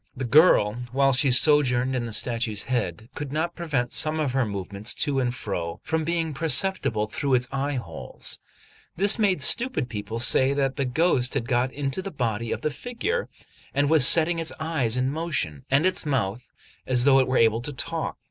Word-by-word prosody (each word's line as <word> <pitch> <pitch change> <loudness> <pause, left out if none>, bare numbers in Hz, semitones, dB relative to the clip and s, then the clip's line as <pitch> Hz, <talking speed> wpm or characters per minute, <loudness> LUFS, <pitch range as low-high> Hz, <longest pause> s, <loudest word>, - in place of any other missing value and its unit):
The 130 - -3
girl, 120 - +4
while 135 +1 +2
she 135 +2 +2
sojourned 130 -2 +2
in 120 -2 -2
the - - -7
statue's 115 -2 -1
head, 110 -5 -3
could 145 -2 -6
not 160 +3 -2
prevent 140 -8 -3
some 155 +1 +1
of 145 -4 -1
her 130 -2 0
movements 100 +2 -3
to 145 -3 -1
and 125 -2 0
fro 85 -8 -5
from 160 0 -2
being 165 -1 -2
perceptible 145 - +1
through 135 +5 -1
its 125 0 0
eye 135 +1 -2
holes; 85 -11 -4 0.6
this 200 +5 +3
made 190 -8 +1
stupid 235 - +3
people 105 +1 -6
say 130 +3 +3
that 135 -1 -1
the 140 - -1
ghost 125 -1 0
had 115 - -2
got 125 0 0
into 140 +4 -3
the 195 - -6
body 115 - -3
of - - -3
the 155 - -2
figure, 325 - -4 0.5
and 145 +1 +1
was 150 -5 +7
setting 165 +1 +4
its 165 -1 +2
eyes 140 -8 -1
in 130 +1 0
motion, 145 - -3
and 140 +5 +2
its 185 - +2
mouth, 125 -5 -3 0.4
as 125 -2 +2
though 135 -1 +5
it 130 - +1
were 130 - 0
about 115 0 +2
to 145 - -5
talk. 165 +4 -4
135 Hz, 195 wpm, -24 LUFS, 120-155 Hz, 0.6 s, was